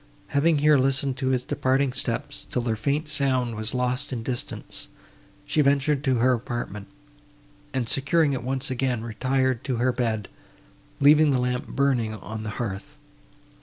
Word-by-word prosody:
Having 150 +3 +3
here 150 0 +5
listened 135 +1 +1
to 130 - -2
his 130 -1 +1
departing 130 0 +1
steps, - - -4
till 125 - -1
their 115 -2 0
faint 140 +8 -1
sound 130 -5 +1
was 110 +2 -3
lost 125 +3 -1
in 120 -3 -3
distance, 120 0 -4 0.6
she 155 - +2
ventured 140 0 +2
to 130 -2 +3
her 125 +2 +3
apartment, 115 -4 -4 0.8
and, 130 -3 -1
securing 140 +4 +2
it 130 - -2
once 130 +2 -2
again, 125 -2 -1
retired 130 +2 0
to 130 -2 -1
her 125 +2 +2
bed, 115 -4 -1 0.7
leaving 150 +2 +6
the 135 - +3
lamp 125 0 -1
burning 125 -6 0
on 110 0 -7
the 110 - -4
hearth. 100 -5 -5
130 Hz, 160 wpm, -25 LUFS, 120-140 Hz, 0.8 s, leaving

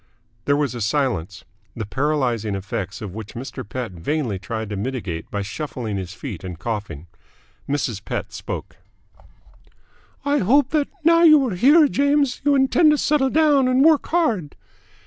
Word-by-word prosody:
There 140 - +3
was 145 -4 -1
a 120 - -6
silence, 100 - -1 0.3
the 110 - -4
paralysing 125 -5 -1
effects 100 +1 -5
of 100 -4 -6
which 110 0 -8
Mr. 130 +1 -6
Pett 120 +1 -5
vainly 105 - -2
tried 110 +2 -5
to - - -2
mitigate 100 -6 -4
by 100 -1 -3
shuffling 110 -1 -5
his 95 0 -6
feet 110 - -7
and 90 -3 -6
coughing. 100 -7 -5 0.6
Mrs. 125 -8 -2
Pett - - -5
spoke. - - -6 1.5
"I 285 0 +2
hope 270 +7 +3
that, 295 -2 +1 0.2
now 335 +1 +5
that 340 - +7
you 300 -4 +6
are 220 - -3
here, 295 - +6
James, 280 -1 +1
you 290 0 +3
intend 275 +4 +4
to 300 - +3
settle 290 -2 +2
down 295 -3 +3
and 255 +3 +3
work 320 -2 +4
hard." 230 - 0
135 Hz, 165 wpm, -22 LUFS, -, 1.5 s, that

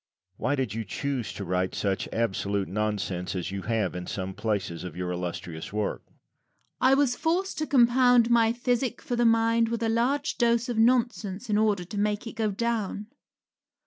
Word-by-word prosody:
Why 145 +3 0
did 130 -7 -2
you 115 0 -3
choose 130 +3 -3
to 100 - -6
write 90 +1 -1
such 100 -1 -1
absolute 100 -3 -1
nonsense 100 -3 -2
as 90 +1 -3
you 100 0 -4
have 110 -2 -1
in 90 0 -6
some 95 -1 -4
places 100 -5 -2
of 90 -4 -7
your 90 0 -3
illustrious 85 -2 -5
work? 105 0 -2
Rabelais. 260 - -4
I - - +6
was 270 -3 +2
forced 355 +6 -1
to 310 - -1
compound 245 -2 +5
my 230 -1 +5
physic 245 +1 -1
for 245 - -3
the 240 0 +2
mind 230 0 +3
with 230 0 -2
a 225 - +1
large 255 +6 0
dose 235 0 +2
of 235 -2 -1
nonsense 230 -3 +1
in 205 - +3
order 210 -4 +2
to 200 +3 -5
make 210 +1 0
it 230 - -6
go 220 -1 0
down. 210 -1 -2
205 Hz, 185 wpm, -27 LUFS, -, -, I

